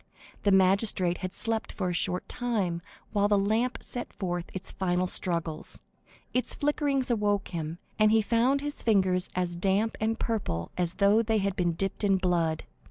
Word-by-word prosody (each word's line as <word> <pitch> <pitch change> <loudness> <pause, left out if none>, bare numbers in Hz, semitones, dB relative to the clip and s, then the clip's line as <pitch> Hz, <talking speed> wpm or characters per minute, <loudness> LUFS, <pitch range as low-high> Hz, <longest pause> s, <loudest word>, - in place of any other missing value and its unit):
The 200 - +2
magistrate 190 -1 +3
had 185 -1 -4
slept 225 +2 +1
for 185 -3 -2
a - - -1
short 180 +1 0
time 205 -9 -1 0.3
while 205 -1 +3
the 205 -1 +3
lamp 220 +5 0
sent 245 - -5
forth 175 -2 -4
its 190 - -5
final 180 -1 0
struggles; 170 -3 -2 0.5
its 250 - 0
flickerings 285 -3 0
awoke 205 -3 +1
him, 165 -2 -4 0.2
and 215 0 +6
he 220 0 +4
found 245 +6 +2
his 290 0 -3
fingers 185 -5 +2
as 180 -1 -1
damp 195 +5 +1
and 225 +1 +1
purple 85 - -2
as 175 -1 -1
though 205 +2 +4
they 225 -1 +1
had 200 -2 0
been 175 -2 +1
dipped 195 +5 -3
in 195 -2 +4
blood. 170 -4 0
195 Hz, 170 wpm, -28 LUFS, 180-225 Hz, 0.5 s, and